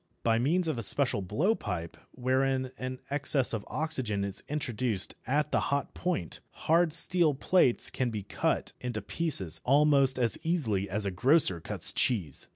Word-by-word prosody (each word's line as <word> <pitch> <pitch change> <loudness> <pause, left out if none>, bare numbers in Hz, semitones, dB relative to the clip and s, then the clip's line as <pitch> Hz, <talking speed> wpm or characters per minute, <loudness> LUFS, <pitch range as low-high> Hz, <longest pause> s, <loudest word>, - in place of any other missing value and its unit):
By 115 -1 +1
means 165 +8 0
of 155 -7 -2
a - - -3
special 125 0 0
blowpipe, 105 - -2
wherein 130 +1 -1
an 130 0 -6
excess 140 -3 +1
of 110 -3 -3
oxygen 130 -10 -3
is 100 -1 -4
introduced 125 -8 -1
at 150 +3 -1
the - - +1
hot 140 0 -2
point, 170 - -4 0.3
hard 165 +1 +3
steel 165 -2 +6
plates 135 -3 +1
can 130 -2 -2
be 105 -3 -5
cut 100 - -2
to 120 -3 -4
pieces 100 - -2
almost 140 -1 +3
as 120 -3 +5
easily 115 - -1
as 105 +2 -2
a 100 - -2
grocer 125 - +2
cuts - - +1
cheese. 90 - -2
130 Hz, 160 wpm, -28 LUFS, 105-150 Hz, 0.3 s, steel